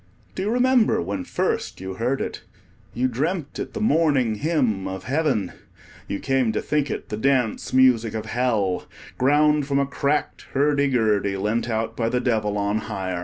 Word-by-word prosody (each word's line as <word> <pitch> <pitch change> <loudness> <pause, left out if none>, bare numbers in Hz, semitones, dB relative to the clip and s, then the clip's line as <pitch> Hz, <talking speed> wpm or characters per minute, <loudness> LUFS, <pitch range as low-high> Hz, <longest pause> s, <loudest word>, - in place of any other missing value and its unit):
Do - - -4
you 200 - -1
remember 250 0 +3
when 95 +2 -3
first - - -2
you 95 0 -5
heard 120 +7 -1
it? - - -4 0.5
You 125 +2 +1
dreamt 150 +5 -2
it - - -5
the - - -2
morning 150 - +2
hymn 120 - 0
of 95 0 -5
Heaven. 130 - 0 0.6
You 100 - -3
came 135 -4 +1
to - - 0
think 150 -2 0
it - - -5
the 105 - -3
dance 125 -1 0
music 125 -4 +4
of 110 0 -3
Hell, 110 -5 0 0.3
ground 150 +2 +3
from 140 -1 +1
a 140 - +2
cracked 140 +2 -2
hurdy 140 +1 +2
gurdy, 105 -6 +1
lent 105 +4 -1
out 110 0 -2
by 115 -1 0
the 125 - 0
Devil 110 -4 0
on 100 +1 0
hire. 95 -5 -4
125 Hz, 175 wpm, -23 LUFS, 105-145 Hz, 0.6 s, music